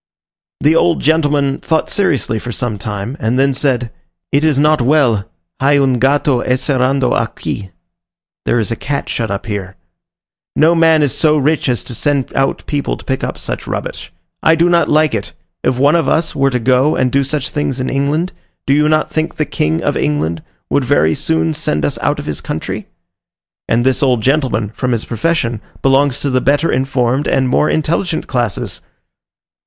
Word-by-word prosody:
The 155 +2 +4
old 170 0 +3
gentleman 145 -3 +1
thought 160 -1 0
seriously 140 - 0
for 120 - -6
some 110 -3 -3
time, 105 +4 -4
and 120 -1 0
then 135 +1 +3
said, 125 -4 0 0.4
"It 140 +2 +2
is 155 -3 +2
not 150 0 +3
well, 120 -6 +2 0.3
hay 140 +2 +3
un 130 -3 +2
gato 135 -1 +2
encerrado 130 0 +1
aqui 100 -2 -3 0.8
(there - - +1
is 110 -1 -1
a - - 0
cat 140 +4 -4
shut 115 -2 -2
up 100 0 -4
here). 100 -3 -5 0.8
No 160 +2 +4
man 165 -2 +4
is 140 - 0
so 155 -1 +3
rich 150 0 +1
as 120 - 0
to - - -7
send 140 +2 -1
out 135 0 0
people 145 -1 -2
to - - -15
pick 130 -1 -2
up - - -3
such - - -5
rubbish. - - -5 0.3
I 160 - +4
do 170 +2 +3
not 170 -1 +3
like 155 -2 +3
it: 100 -3 -3 0.3
if 125 - +1
one 140 +3 +4
of 165 -5 +1
us 160 +3 +1
were 135 0 +2
to 125 - 0
go 130 +5 +2
and 125 -1 +1
do 140 +2 +2
such 140 0 -2
things 140 -3 -2
in 130 - -2
England, 145 +6 0 0.3
do 150 +2 +3
not 155 0 +2
you - - -18
think 160 +1 -1
the 155 - 0
King 80 - -1
of - - 0
England 80 +2 -1 0.3
would 140 - +2
very 120 - +2
soon 80 0 0
send 75 0 -1
us - - -2
out - - +1
of - - -6
his 75 -2 -4
country?" - - -5 0.8
And 120 +2 +1
this 130 -1 +2
old 125 -5 +2
gentleman, 130 -6 +1
from 125 0 -1
his 115 - -2
profession, 120 -2 -1 0.2
belongs 135 0 +3
to 140 - -1
the 130 0 +2
better 145 +5 +2
informed 130 +1 0
and 130 -1 +1
more 150 +4 +2
intelligent 160 +2 -1
classes! 120 -8 -2
135 Hz, 190 wpm, -16 LUFS, 120-150 Hz, 0.8 s, The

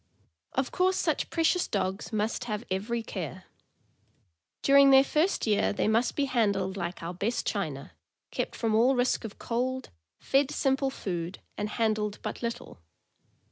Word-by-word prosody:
Of 265 0 -1
course 370 0 +2
such - - 0
precious 335 +2 +2
dogs 190 +2 -2
must 215 +2 -1
have 215 -1 -3
every 225 +5 -1
care. 185 -3 -6 1.2
During 275 0 +7
their 270 0 +8
first 310 +7 +1
year 210 -2 +2
they 205 - 0
must 225 +3 +2
be 285 - +1
handled 200 -7 +1
like 175 -3 -4
our 170 +2 -4
"best 205 +7 -2
china," - - -3 0.4
kept - - -3
from 225 -2 0
all 240 +5 +4
risk 245 0 +1
of 210 - -8
cold, 255 +2 -2 0.3
fed 275 0 +2
simple 270 -2 +1
food, 180 -7 -4 0.2
and 210 0 -3
handled 215 -2 0
but - - -4
little. 235 - -5
230 Hz, 150 wpm, -28 LUFS, 200-265 Hz, 1.2 s, their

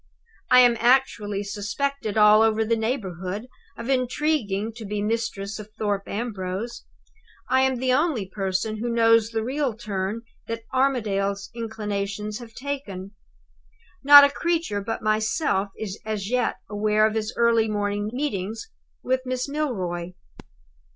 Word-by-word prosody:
"I 250 - +8
am 240 -1 +5
actually 230 -5 +2
suspected 215 +3 -3
all 210 0 +7
over 220 0 +3
the 230 +1 +2
neighborhood 210 -3 -3 0.3
of 230 - -6
intriguing 250 -5 0
to 230 - -7
be 210 0 -3
mistress 210 -1 -2
of 215 0 -9
Thorpe 205 -2 -1
Ambrose. 205 0 -4 0.7
I 260 0 +5
am 265 0 +2
the 255 +1 +1
only 285 - +1
person 195 +2 -2
who 235 +3 -3
knows 230 -1 +4
the 225 -1 -2
real 265 -1 -1
turn 210 0 -3 0.2
that 230 0 -4
Armadale's 200 -7 0
inclinations 210 -2 -4
have 230 -2 -12
taken. 235 -9 -5 0.9
Not 285 +1 +11
a 280 - +4
creature 320 -9 -1
but 225 +3 -4
myself 215 - +1
is 205 -2 -5
as 215 -1 -4
yet 250 -1 +1
aware 215 +1 +2
of 215 - +1
his 220 0 -2
early 230 -1 +3
morning 205 0 -1
meetings 225 - -3 0.3
with 260 0 +1
Miss 255 0 -2
Milroy. 185 - -3
220 Hz, 135 wpm, -24 LUFS, 205-250 Hz, 0.9 s, Not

